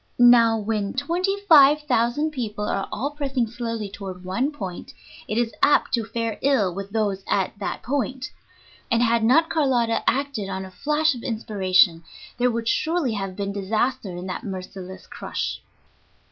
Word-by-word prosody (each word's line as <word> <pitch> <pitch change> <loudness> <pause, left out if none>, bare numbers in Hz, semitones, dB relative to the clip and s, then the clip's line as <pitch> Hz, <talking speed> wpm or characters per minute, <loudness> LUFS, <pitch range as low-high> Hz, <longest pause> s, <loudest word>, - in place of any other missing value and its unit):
Now, 235 -2 +6
when 210 -2 -2
twenty 355 +8 -1
five 300 -5 +6
thousand 255 +3 +1
people 215 -7 -4
are 195 - -2
all 255 +7 -2
pressing 275 -4 -1
slowly 230 -2 -4
toward 190 -2 -8
one 240 +11 -1
point, 190 -11 -7 0.3
it 215 - -2
is 235 -2 0
apt 290 - +3
to 230 -2 +1
fare 225 0 -3
ill 230 -10 +2
with 195 +2 -6
those 205 -3 -1
at 195 +1 0
that 200 - -4
point; 265 +1 -2 0.6
and 235 0 +3
had 230 -1 +2
not 295 +8 +4
Carlotta 250 -7 +1
acted 275 -7 -2
on 190 0 -4
a 190 - -11
flash 300 +9 +1
of 245 - -8
inspiration 190 -7 +2 0.4
there 250 0 +3
would 230 -1 -3
surely 315 -3 +1
have 195 -3 -4
been 200 0 -3
disaster 215 +3 -1
in 175 0 -6
that 185 - -5
merciless 190 -1 -7
crush. - - -4
230 Hz, 160 wpm, -23 LUFS, 200-270 Hz, 0.6 s, Now